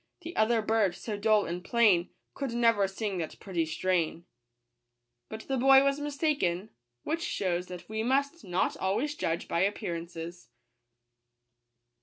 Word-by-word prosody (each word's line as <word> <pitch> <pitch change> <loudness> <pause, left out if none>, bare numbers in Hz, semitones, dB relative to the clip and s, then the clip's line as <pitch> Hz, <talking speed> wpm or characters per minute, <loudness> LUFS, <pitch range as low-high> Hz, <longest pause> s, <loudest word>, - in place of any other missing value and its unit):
The 335 - -8
other 220 0 +2
bird, 215 -5 +2
so 215 - -5
dull 210 0 +3
and 175 +1 -4
plai 205 -7 +3 0.2
Could 275 -4 -4
never 230 -4 +3
sing 195 -1 -3
that 160 - -5
pretty 170 -5 -2
strain 170 0 -1 1.0
But 220 - -6
the 270 +3 -2
boy 270 +2 +7
was 275 +1 +1
mistaken; 285 - -1 0.3
which 330 +1 -2
shews 180 - -1
that 175 -1 -9
we 220 0 -3
must 280 +7 0
not 180 0 0
always 225 +11 0
judge 170 - -2
by 170 - 0
appearances. 175 - -3
205 Hz, 140 wpm, -29 LUFS, 175-245 Hz, 1.0 s, boy